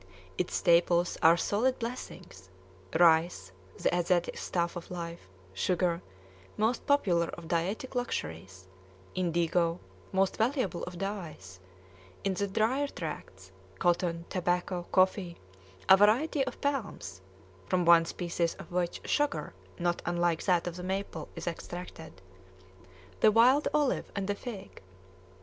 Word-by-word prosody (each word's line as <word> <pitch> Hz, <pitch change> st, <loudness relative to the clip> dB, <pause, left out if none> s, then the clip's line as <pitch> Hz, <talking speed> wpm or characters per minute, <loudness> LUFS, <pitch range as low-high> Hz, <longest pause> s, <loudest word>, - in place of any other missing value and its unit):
Its 180 Hz, -, -2 dB
staples 175 Hz, +1 st, +3 dB
are 165 Hz, +1 st, +6 dB
solid 235 Hz, +9 st, +1 dB
blessings: 185 Hz, -, -7 dB, 0.5 s
rice, 160 Hz, -, +4 dB, 0.3 s
the -, -, +1 dB
Asiatic's 175 Hz, 0 st, 0 dB
staff 170 Hz, 0 st, -1 dB
of 175 Hz, -, -7 dB
life; 170 Hz, -, -7 dB, 0.2 s
sugar, 170 Hz, -, 0 dB, 0.6 s
most 225 Hz, +3 st, 0 dB
popular 180 Hz, -, +3 dB
of 170 Hz, -1 st, -9 dB
dietetic 185 Hz, +11 st, -2 dB
luxuries; 95 Hz, -, -4 dB, 0.5 s
indigo, 170 Hz, -1 st, +1 dB, 0.3 s
most 190 Hz, 0 st, +1 dB
valuable 230 Hz, -, 0 dB
of 180 Hz, 0 st, -8 dB
dyes; 170 Hz, -, -6 dB, 0.6 s
in 195 Hz, -, +1 dB
the 200 Hz, +2 st, -1 dB
drier 235 Hz, +8 st, +1 dB
tracts, 95 Hz, -, -7 dB, 0.3 s
cotton, 170 Hz, -, +1 dB
tobacco, 180 Hz, 0 st, -1 dB
coffee, 185 Hz, -2 st, +2 dB, 0.5 s
a 190 Hz, -, +10 dB
variety 245 Hz, +9 st, +3 dB
of 255 Hz, -, -6 dB
palms 235 Hz, -, -3 dB, 0.5 s
(from 180 Hz, -, +1 dB
one 170 Hz, -1 st, +7 dB
species 170 Hz, -1 st, -2 dB
of -, -, -12 dB
which 175 Hz, -1 st, -2 dB
sugar 230 Hz, -, 0 dB, 0.2 s
not 175 Hz, 0 st, 0 dB
unlike 175 Hz, -1 st, +1 dB
that 180 Hz, -3 st, +3 dB
of 175 Hz, 0 st, -4 dB
the 180 Hz, -, -6 dB
maple 190 Hz, -4 st, -4 dB
is -, -, -6 dB
extracted), 165 Hz, -, -7 dB, 1.0 s
the 215 Hz, -, +6 dB
wild 250 Hz, +7 st, +5 dB
olive, 295 Hz, -3 st, 0 dB
and 200 Hz, -1 st, -1 dB
the 205 Hz, -, +1 dB
fig. 200 Hz, -2 st, -8 dB
175 Hz, 125 wpm, -30 LUFS, 170-200 Hz, 1.0 s, a